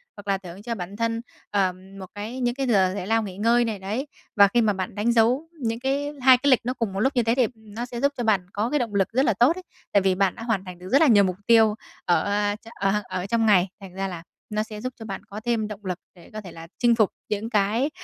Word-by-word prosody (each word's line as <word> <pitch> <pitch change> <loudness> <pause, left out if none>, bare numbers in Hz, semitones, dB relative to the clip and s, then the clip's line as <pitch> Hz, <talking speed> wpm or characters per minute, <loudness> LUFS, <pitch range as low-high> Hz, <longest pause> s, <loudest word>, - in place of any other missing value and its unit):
hoặc 205 0 -12
là 195 -1 +2
thưởng 185 +1 -10
cho 230 +1 -4
bản 190 0 -6
thân, 230 +1 -1 0.3
ờ, 195 -3 +2 0.3
một 190 - -6
cái 220 +5 -5
những 240 -1 0
cái 270 -1 -2
giờ 190 -5 +3
giải 190 -1 -4
lao 225 0 +2
nghỉ 190 -2 -7
ngơi 235 +3 +3
này, 220 -3 -3
đấy. 215 +9 -3 0.3
Và 200 -1 +7
khi 235 +4 +2
mà 210 -2 +2
bạn 190 +1 -4
đánh 220 +3 +1
dấu 240 +7 +3
những 230 -1 -1
cái 280 +3 -1
2 255 0 +7
cái 280 +3 +1
lịch 255 - +6
nó 250 - 0
cùng 230 -6 -3
một 195 - -3
lúc 265 +5 +1
như 245 - +3
thế 230 +2 +2
thì 250 -4 +3
nó 220 +2 -7
sẽ 240 -1 -6
giúp 280 +1 +3
cho 245 - -2
bạn 200 -5 +2
có 210 +3 -1
cái 295 - +1
động 230 -5 -3
lực 195 -2 +3
rất 265 +4 +2
là 225 - +3
tốt 245 +5 +6
đấy. 370 - -8 0.3
Tại 200 - +5
vì 190 -1 +2
bạn 195 -1 +1
đã 230 - -8
hoàn 220 -5 -1
thành 180 -1 -9
được 180 - -10
rất 275 - +5
là 320 - +6
nhiều 205 -4 +6
mục 185 -2 0
tiêu 225 -2 +5 0.3
ở, 175 - +3
a, 205 0 0 0.2
ở 195 +2 +1
ở 185 -1 -4
trong 225 +2 +1
ngày, 190 -4 +5
thành 190 -2 -10
ra 195 +1 -2
là 170 -3 -7 0.3
nó 215 0 -1
sẽ 215 -1 -9
giúp 255 +2 -4
cho 225 - -8
bạn 195 -3 -5
có 205 - -7
thêm 230 -3 0
động 210 -1 -9
lực 180 -1 -3 0.2
để 175 - -16
có 215 - -5
thể 185 -4 -10
là 165 0 -10
chinh 240 -1 +4
phục 215 -4 +3 0.2
những 215 +2 -2
cái 215 +5 +1
215 Hz, 290 wpm, -24 LUFS, 195-240 Hz, 0.3 s, Và